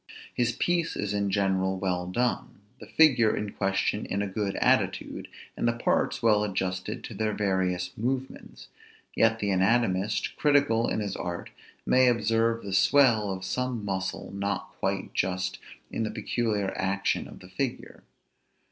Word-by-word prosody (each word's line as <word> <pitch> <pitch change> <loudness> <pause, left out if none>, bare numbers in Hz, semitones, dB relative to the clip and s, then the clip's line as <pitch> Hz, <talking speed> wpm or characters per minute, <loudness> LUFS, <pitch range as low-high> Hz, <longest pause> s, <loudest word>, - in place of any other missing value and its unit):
His 120 -1 +1
piece 170 +6 0
is 105 -1 -2
in 100 -1 0
general 95 -1 +1
well 90 -2 -1
done, 120 0 -2 0.2
the - - -11
figure 130 -9 +4
in 105 -1 -3
question 100 +2 -1
in 100 +1 -1
a - - -2
good 100 0 -2
attitude, - - +1 0.3
and - - -1
the 115 - +2
parts 120 +1 0
well 105 -2 +4
adjusted 95 -2 -3
to - - -7
their 110 -1 -1
various 95 -3 -1
movements; 130 +3 -4 0.5
yet 115 0 +3
the 100 -3 -1
anatomist, 100 +1 +1
critical 140 -6 +3
in - - -1
his 100 -2 -3
art, 85 0 -5 0.3
may 130 0 +5
observe 115 0 +2
the 100 -1 -5
swell 115 -1 +4
of 95 -1 -4
some 125 +1 -2
muscle 95 -1 -3
not 100 -1 -2
quite - - -2
just 90 0 -1 0.3
in - - -3
the 110 - -1
peculiar 105 -5 -1
action 95 +1 -1
of - - -12
the 90 - -14
figure. 120 +7 -4
105 Hz, 155 wpm, -27 LUFS, 95-115 Hz, 0.5 s, may